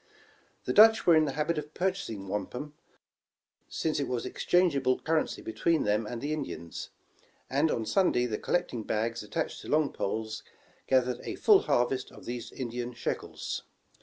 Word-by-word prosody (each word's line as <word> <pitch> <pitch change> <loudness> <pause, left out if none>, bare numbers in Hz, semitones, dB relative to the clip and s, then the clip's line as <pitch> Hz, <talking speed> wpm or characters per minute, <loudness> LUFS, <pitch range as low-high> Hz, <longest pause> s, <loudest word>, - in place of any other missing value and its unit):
The - - 0
Dutch 220 +1 +7
were 170 - +7
in 155 0 +5
the 140 - -2
habit 155 +2 0
of 150 +1 -9
purchasing 180 - -2
wampum, 125 +9 -4 1.0
since 155 -2 -1
it 140 - -1
was 125 -2 -2
exchangeable 140 -8 +2
currency 160 0 -1
between 160 +8 +1
them 105 +1 +1
and 120 +2 -5
the 150 +2 -1
Indians, 135 - -5 0.6
and 145 +4 +3
on 115 - -1
Sunday 175 - +2
the 110 -3 -2
collecting 150 -10 -1
])ags 115 +2 -1
attached 155 +10 -3
to - - -10
long 155 -1 +2
poles, 110 +2 -3 0.5
gathered 125 -2 +2
a - - -5
full 415 -3 +6
harvest 125 - 0
of - - -13
these 120 0 -5
Indian 120 -1 -5
sheckles. - - -4
130 Hz, 160 wpm, -29 LUFS, 115-155 Hz, 1.0 s, Dutch